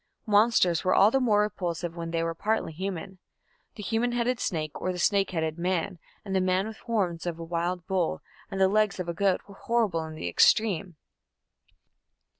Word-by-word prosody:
Monsters 205 -5 +3
were 185 - +2
all 205 +3 +6
the 270 - +3
more 215 -5 +3
repulsive 175 -4 -3
when 165 -1 -5
they 165 0 -1
were 165 0 -1
partly 210 -1 -1
human. 190 +1 -5 0.6
The 210 - -8
human 235 +4 0
headed 240 0 0
snake 155 -4 -2
or 185 - 0
the 180 - -5
snake 195 +2 +2
headed 160 -2 -2
man 175 0 -1 0.3
and 195 -1 -3
the 190 - +3
man 185 +1 +1
with 220 0 -7
the - - -21
horns 185 -8 -1
of 170 -2 -3
a 165 - -7
wild 170 +1 -2
bull 185 -4 -1 0.3
and 195 - -4
the 190 - +5
legs 210 0 +1
of 180 - -3
a 170 - -2
goat 195 +2 +1
were 200 - -12
horrible 205 -6 0
in 160 0 -8
the 90 - -5
extreme. 185 - +3
185 Hz, 200 wpm, -27 LUFS, 170-210 Hz, 0.6 s, all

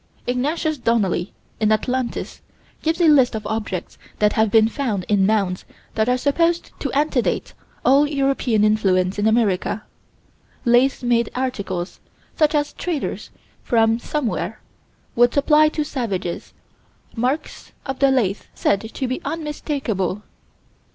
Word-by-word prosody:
Ignatius 295 +4 -1
Donnelly, 200 -7 0 0.3
in 215 -1 +2
Atlantis, 245 +3 -2 0.4
gives 320 +2 0
a 340 - +4
list 270 -6 +5
of 215 -1 -5
objects 210 -4 -4 0.2
that 210 0 +2
have 220 0 +2
been 220 +1 +5
found 225 -7 -2
in 195 -2 +3
mounds 195 -4 0 0.3
that 220 +2 +1
are 250 - +3
supposed 335 +6 +1
to 275 - -3
antedate 280 -3 0 0.3
all 280 +3 +5
European 270 -6 +1
influence 195 -3 +2
in 205 - +2
America: 220 -2 +1 0.8
lathe 250 +3 +3
made 235 -2 +2
articles, 200 -9 -3 0.4
such 305 -1 +2
as 290 0 0
traders 335 -6 -4 0.3
from 225 -1 +2
somewhere 270 -1 -3 0.6
would 240 0 +4
supply 300 +2 +5
to 305 0 -2
savages 205 - -4 0.6
marks 260 +6 -3
of 270 -1 -4
the 275 - +5
lathe 220 -7 +1
said 200 - +1
to 225 +4 -4
be 255 - -3
unmistakable. 275 - -3
240 Hz, 130 wpm, -21 LUFS, 210-280 Hz, 0.8 s, list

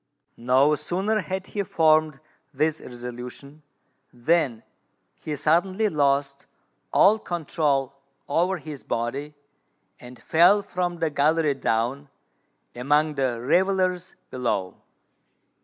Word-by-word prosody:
No 130 +5 +3
sooner 195 +8 -1
had 190 0 -4
he 205 - -4
formed 155 -5 +2 0.3
this 155 +2 -1
resolution, 125 +4 -9 0.5
than 125 -2 0 0.5
he 150 - -6
suddenly 175 +8 +1
lost 140 -3 0 0.4
all 215 +2 +5
control 150 -7 -1 0.3
over 175 +6 +1
his 155 -4 -9
body, 135 +6 -4 0.6
and 125 0 -13
fell 180 +5 +4
from 180 -2 -3
the 165 -2 -1
gallery 150 +1 +2
down 135 +3 -2 0.6
among 145 +5 +1
the 130 -4 -1
revellers 185 +4 +1 0.2
below. 115 -7 -3
150 Hz, 100 wpm, -24 LUFS, 135-175 Hz, 0.6 s, all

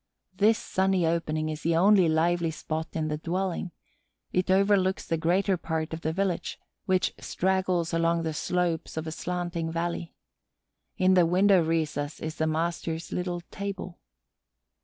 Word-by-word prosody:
This 215 +4 +4
sunny 190 -2 +1
opening 155 -1 0
is 155 0 -5
the 165 0 +1
only 185 0 +5
lively 170 +1 +2
spot 160 0 -4
in 160 -1 -1
the 150 -1 -2
dwelling; 180 +2 -2 0.6
it 180 0 +1
overlooks 190 0 +3
the 165 - 0
greater 180 +4 +1
part 160 -1 -3
of 160 - -5
the 160 - -1
village, 190 0 -2 0.3
which 190 -2 +1
straggles 185 -2 0
along 165 0 +2
the 160 -1 -2
slopes 175 -1 -1
of 160 - -2
a 160 - -4
slanting 175 -1 -3
valley. 170 0 -3 0.8
In 185 0 +4
the 180 -2 +5
window 185 +1 +4
recess 155 -2 -1
is 155 0 -5
the 160 - +1
master's 165 +1 -2
little 180 -1 -2
table. 195 -3 -5
170 Hz, 150 wpm, -27 LUFS, 160-185 Hz, 0.8 s, only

